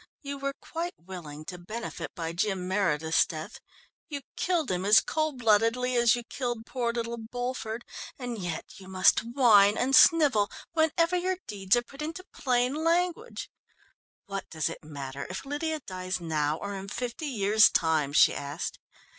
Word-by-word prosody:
"You 280 0 -5
were 275 0 -3
quite 340 +2 -5
willing 165 -4 -9
to 180 +1 -7
benefit 220 +7 -6
by 165 -2 -4
Jim 185 0 -1
Meredith's 165 -5 +2
death; 155 -1 -7 0.5
you 285 -2 -4
killed 340 - 0
him 180 0 -1
as 210 +2 +7
cold 310 -3 -1
bloodedly 230 +2 +2
as 240 0 +5
you 240 - -5
killed 240 -2 -4
poor 240 -2 -1
little 235 0 -3
Bulford, 240 0 -4 0.3
and 245 -4 -5
yet 175 -4 -4
you 190 - -12
must 190 0 +4
whine 220 -4 +5
and 270 +2 +2
snivel 275 -13 +6 0.2
whenever 330 +2 +2
your 365 +1 0
deeds 195 -1 +1
are 240 - +1
put 275 +4 -12
into 325 +4 -5
plain 250 0 +1
language. 355 +6 0 0.7
What 195 -1 -6
does 160 -1 -1
it 165 - -9
matter 140 -2 -6
if 185 +7 -6
Lydia 305 +2 -2
dies 185 -3 -4
now 155 -2 -1
or 200 +3 -5
in 195 0 -6
fifty 245 +8 -4
years 215 -4 +5
time?" 160 -4 +1
she 145 - +6
asked. 145 0 -5
225 Hz, 165 wpm, -28 LUFS, 185-275 Hz, 0.7 s, as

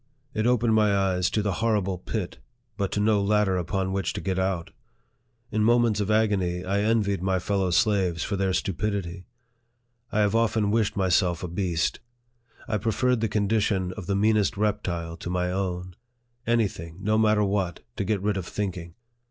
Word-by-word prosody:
It 110 +1 0
opened 120 -2 +3
my 105 -2 +3
eyes 95 -2 +1
to 105 - 0
the 100 - 0
horrible 100 -5 +1
pit, 95 -1 -4 0.4
but 100 -3 -2
to - - 0
no 105 0 +3
ladder 105 -1 +2
upon 95 +2 -1
which 95 -1 -1
to - - -4
get 95 -1 -2
out. 95 -1 -1 0.8
In 110 -1 +1
moments 115 -2 +3
of 105 0 -1
agony, 95 -5 +1
I 100 +2 0
envied 105 -3 +1
my 95 0 +1
fellow 95 +1 0
slaves 90 -2 +2
for 100 - -2
their 95 -1 0
stupidity. 95 -1 -2 0.8
I 110 - +2
have 105 0 +2
often 110 -2 +2
wished 110 -1 +1
myself 90 -2 +2
a - - -2
beast. 85 -2 -1 0.7
I 105 -1 -1
preferred 115 +3 +1
the 115 - 0
condition 100 -3 0
of 95 -4 -8
the 100 - 0
meanest 105 0 +2
reptile 90 -6 -2
to - - -6
my 90 0 -1
own. 90 -1 -3 0.5
Any 115 -2 +3
thing, 85 -3 -10
no 110 +2 +2
matter 105 -1 +3
what, 95 -4 -1 0.2
to - - 0
get 100 -1 -1
rid 105 -1 0
of 90 -2 -4
think 100 -3 -3
ing 85 -1 -9
100 Hz, 180 wpm, -26 LUFS, 90-105 Hz, 0.8 s, opened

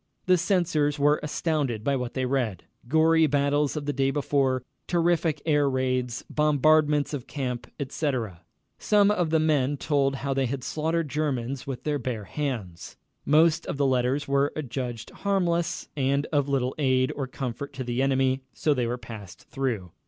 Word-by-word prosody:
The 185 - +5
censors 170 -5 +1
were 145 +1 +3
astounded 150 -7 -1
by 140 +3 +1
what 125 -2 -4
they 130 -1 0
read... 125 -8 -1 0.2
gory 160 +3 +4
battles 145 +1 +1
of 145 - -4
the 145 - -1
day 135 0 +1
before, 135 -2 +1 0.2
terrific 170 -3 +1
air 145 -3 +3
raids, 130 -2 -1
bombardments 150 0 +3
of 135 -4 -5
camp, 125 -4 -4
etc. 130 - -2 0.4
Some 205 -1 +4
of 175 -6 +1
the 160 - +3
men 145 -3 +2
told 140 -2 +1
how 135 0 -2
they 135 -1 +1
had 130 +1 -4
slaughtered 160 +3 -1
Germans 140 -3 -2
with 130 -2 -5
their 150 -1 -1
bare 120 -4 -3
hands. 110 - -5 0.3
Most 160 +2 +4
of - - -3
the 140 - +2
letters 130 +2 +1
were 140 +1 +2
adjudged 125 -5 -5
harmless, 175 -3 -1
and 140 +1 +1
of 145 -1 +2
little 130 -2 0
aid 130 -2 +2
or 135 -2 -3
comfort 130 +1 -5
to 130 - -4
the 120 +1 -1
enemy, 135 -1 +2
so 150 - +2
they 125 -4 0
were 120 +1 -2
passed 110 -5 -11
through. 115 -10 -2
140 Hz, 165 wpm, -26 LUFS, 130-150 Hz, 0.4 s, The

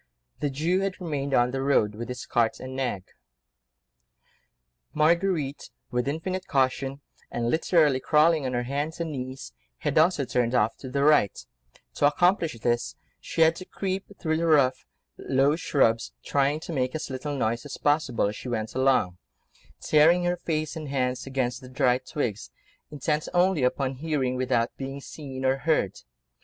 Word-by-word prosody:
The 145 - 0
Jew 160 +7 0
had 195 0 -2
remained 140 -6 -2
on 120 0 +3
the 135 0 -2
road, 135 -6 +2
with 115 +3 -6
his 125 0 -5
cart 115 -2 +1
and 130 0 -7
nag. 125 -8 -2 1.9
Marguerite, 155 -2 +1 0.2
with 125 +1 -1
infinite 185 +6 -3
caution, 135 0 0 0.3
and 120 0 -1
literally 160 -4 +3
crawling 155 +2 +3
on 130 - -3
her 120 0 0
hands 145 +6 -3
and 165 -2 -2
knees, 130 - -6 0.2
had - - +1
also 160 -4 +3
turned 125 -1 0
off 105 -1 +2
to 130 - -8
the 140 +2 0
right: 150 -9 +3 0.5
to 145 - +3
accomplish 175 - +2
this 120 0 0 0.2
she - - -3
had 160 0 +6
to 185 - -8
creep 190 0 -3
through 160 -1 0
the 170 +1 0
rough, 140 -5 +3 0.3
low 135 +3 +2
shrubs, 115 -8 +1
trying 140 +2 +1
to 165 - -6
make 130 -1 -1
as 155 - -4
little 140 +2 -4
noise 115 -1 -1
as 145 - -7
possible 145 -7 +1
as 105 +1 -2
she 125 - -7
went 110 -2 -3
along, 130 -9 +2 0.6
tearing 165 +4 +4
her 175 0 +1
face 155 -3 -3
and 155 -3 -6
hands 130 -1 -1
against 130 -1 -2
the 130 - -11
dry 125 0 +2
twigs, 125 -6 -4 0.4
intent 150 +1 -2
only 180 -3 +3
upon 130 +1 0
hearing 135 -2 -1
without 120 -2 0
being 135 +1 -5
seen 135 -2 -7
or 130 +1 +3
heard. 150 - +1
140 Hz, 165 wpm, -26 LUFS, 125-155 Hz, 1.9 s, had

